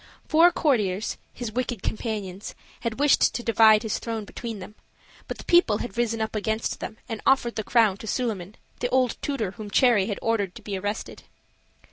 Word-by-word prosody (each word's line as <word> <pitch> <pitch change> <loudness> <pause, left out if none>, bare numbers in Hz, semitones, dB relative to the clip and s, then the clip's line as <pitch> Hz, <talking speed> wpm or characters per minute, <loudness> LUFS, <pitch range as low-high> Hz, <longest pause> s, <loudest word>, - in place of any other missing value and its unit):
Four 335 +2 +6
courtiers, 215 - 0
his 240 -3 -6
wicked 240 -2 -3
companions, 210 -4 -4 0.2
had 230 -2 -3
wished 290 0 +4
to 240 - -3
divide 220 -1 +5
his 220 - -2
throne 225 -2 -4
between 230 +1 -6
them; 195 +2 -10 0.5
but - - -5
the - - -10
people 345 -12 +4
had 240 - -6
risen 230 -2 0
up 220 0 -3
against 220 +1 -2
them 220 - -6
and 225 -2 -5
offered 265 -3 +3
the 220 - -2
crown 220 -4 +3
to 220 - -9
Suliman, 210 -5 -2 0.2
the 245 - -1
old 255 -2 +2
tutor 245 -10 -2
whom 215 0 -8
Cherry 210 -3 +4
had 205 - -2
ordered 205 -5 0
to - - -11
be 205 - -4
arrested. 205 +3 -4
220 Hz, 185 wpm, -25 LUFS, 205-240 Hz, 0.5 s, Four